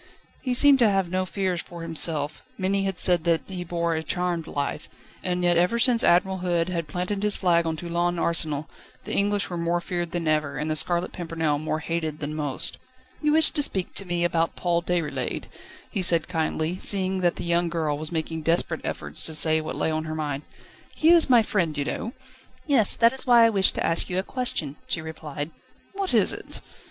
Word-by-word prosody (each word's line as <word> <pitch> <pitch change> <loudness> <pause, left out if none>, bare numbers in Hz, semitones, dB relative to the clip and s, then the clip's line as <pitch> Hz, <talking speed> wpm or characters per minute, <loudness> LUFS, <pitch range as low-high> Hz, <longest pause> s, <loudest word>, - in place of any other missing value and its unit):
He 255 -2 -1
seemed 280 +1 +6
to 230 -3 +5
have 195 -3 0
no 185 0 -1
fears 185 -3 -2
for 170 -1 -10
himself; 155 -2 -2 0.2
many 195 +1 0
had 195 -2 -3
said 175 -3 +3
that 165 -2 +2
he 185 -2 -6
bore 170 -1 -2
a 160 - -2
charmed 175 -1 -2
life; 140 0 -4 0.3
and 180 -1 -1
yet 175 -1 +3
ever 180 +7 +2
since 235 -1 +4
Admiral 190 +2 +3
Hood 175 -1 0
had 170 -3 -3
planted 180 +6 -3
his 210 -1 +1
flag 170 -3 +2
on 160 -1 -2
Toulon 175 +1 -1
Arsenal, 160 -3 0 0.4
the - - -6
English 205 -1 0
were 175 - -3
more 170 +1 0
feared 175 -1 -4
than 170 -1 -3
ever, 150 -2 0
and 150 +3 -2
The - - 0
Scarlet 175 +3 +2
Pimpernel 160 -4 -2
more 155 +1 -3
hated 160 -2 -3
than 150 0 -4
most. 150 -3 0 0.4
"You 300 -1 +2
wished 320 0 +6
to - - +4
speak 190 -9 0
to 195 - -2
me 175 -1 -1
about 165 -1 0
Paul 170 -1 0
Déroulède," 170 -3 -2 0.5
he 200 - -2
said 170 -2 +4
kindly, 160 0 -2
seeing 190 -1 +1
that 175 -2 +1
the - - -6
young 170 0 +1
girl 160 -3 -1
was 155 +2 -2
making 160 -1 -3
desperate 165 0 0
efforts - - -5
to 160 - 0
say 155 0 +3
what 155 - -6
lay 160 - 0
on 155 0 -2
her 155 0 -4
mind. 145 -3 -3 0.5
"He 320 - +3
is 335 -4 +7
my 240 -3 +6
friend, 170 -8 -1
you 145 - -1
know." 230 - -4 0.5
"Yes; 260 -9 +5
that 230 +1 +4
is 265 - -3
why 240 -2 +7
I 230 - +3
wished 195 -2 +2
to - - -1
ask 165 - +1
you 180 - -2
a 190 - 0
question," 195 - -2
she - - -1
replied. 155 -1 -6 0.4
"What 390 -1 -3
is - - +3
it?" - - -5
175 Hz, 210 wpm, -25 LUFS, 160-190 Hz, 0.5 s, is